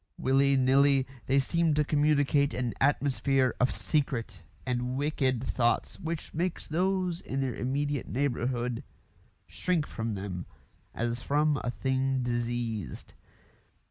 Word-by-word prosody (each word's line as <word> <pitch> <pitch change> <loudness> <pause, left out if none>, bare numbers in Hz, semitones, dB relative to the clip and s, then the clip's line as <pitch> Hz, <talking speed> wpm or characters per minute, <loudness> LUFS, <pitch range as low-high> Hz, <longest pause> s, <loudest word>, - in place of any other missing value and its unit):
Willy 135 +1 +3
nilly, 135 +1 +4 0.2
they 135 - +3
seem 160 +3 +2
to 150 - +3
communicate 145 -1 +2
an 125 -2 -1
atmosphere 135 -2 +2
of 125 - +3
secret 115 - -1 0.2
and 125 0 -1
wicked 135 -4 0
thoughts 120 -2 0
which 165 -3 -5
makes 175 +2 -2
those 180 +1 0
in 135 - -4
their 130 -2 -1
immediate 140 +3 -2
neighbourhood 125 -2 -1 0.6
shrink 175 -5 -1
from 115 -1 -4
them 95 -2 -5 0.5
as 120 +1 -2
from 150 +1 +1
a - - -1
thing 130 +1 0
diseased. 120 -4 -3
135 Hz, 120 wpm, -29 LUFS, 120-145 Hz, 0.6 s, nilly